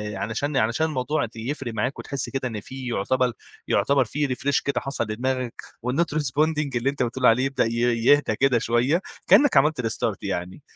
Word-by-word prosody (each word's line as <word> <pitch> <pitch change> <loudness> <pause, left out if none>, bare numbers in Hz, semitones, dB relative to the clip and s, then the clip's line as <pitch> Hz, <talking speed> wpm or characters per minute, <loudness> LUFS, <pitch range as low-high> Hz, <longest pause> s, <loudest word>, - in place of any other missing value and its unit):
علشان 135 +7 -2
علشان 125 +6 +2
الموضوع 145 -1 -1
يفرِق 120 +1 -4
معاك 110 +6 -2
وتحس 140 -1 -4
كده 135 -1 -2
إن 110 -3 -5
في 130 +3 -8
يُعتبَل 125 +3 0 0.3
يُعتبَر 135 +8 +2
فيه 150 0 -1
refresh 140 +2 0
كده 140 -3 0
حصَل 135 -2 -2
لدماغك 125 +2 -3 0.3
والnot 155 +4 0
responding 150 +1 +1
اللي 120 +3 +1
أنت 140 -2 -1
بتقول 125 +2 -2
عليه 125 +3 +5
يبدأ 135 -3 +1
ي 115 - -2 0.3
يهدّى 145 -5 +4
كده 130 0 +3
شوية، 120 +10 +1 0.3
كأنك 285 - +6
عملت 150 -1 +3
restart 110 -2 -2
يعني، 95 +2 -4
130 Hz, 175 wpm, -24 LUFS, 115-140 Hz, 0.3 s, كأنك